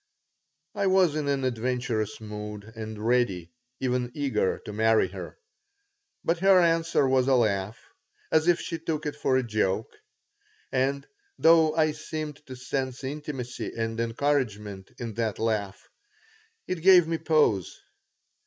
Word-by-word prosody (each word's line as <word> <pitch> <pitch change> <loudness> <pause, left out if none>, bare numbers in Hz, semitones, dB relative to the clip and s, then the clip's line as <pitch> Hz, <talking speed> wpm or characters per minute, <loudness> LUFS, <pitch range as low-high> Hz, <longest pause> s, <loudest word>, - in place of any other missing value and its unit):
I 200 - 0
was 185 -4 +4
in 150 -2 -2
an 140 -1 0
adventurous 120 -3 -2
mood 105 -1 -7
and 110 -1 -6
ready, 115 -9 +1 0.3
even 125 -1 -1
eager, 140 -9 0
to 105 - -6
marry 110 -2 +3
her. 95 0 -8 0.9
But 165 +1 +1
her 190 0 +6
answer 165 -4 +2
was 130 -1 +2
a 135 - +4
laugh, 105 -3 0 0.5
as 160 +1 +3
if 175 0 +4
she 165 -2 -4
took 155 -2 -3
it 150 - -3
for 130 - +1
a 130 - +1
joke; 110 -2 -1 0.8
and, 135 +2 0 0.3
though 160 -1 +5
I 155 -1 +3
seemed 155 -1 -6
to 130 - -7
sense 130 0 -4
intimacy 135 -3 -5
and 115 0 -2
encouragement 115 -6 -1
in 115 -2 -5
that 110 -3 -1
laugh, 105 -3 -2 0.8
it 185 -3 -3
gave 180 -2 +7
me 165 -1 -1
pause. 130 - +1
130 Hz, 140 wpm, -27 LUFS, 110-155 Hz, 0.9 s, gave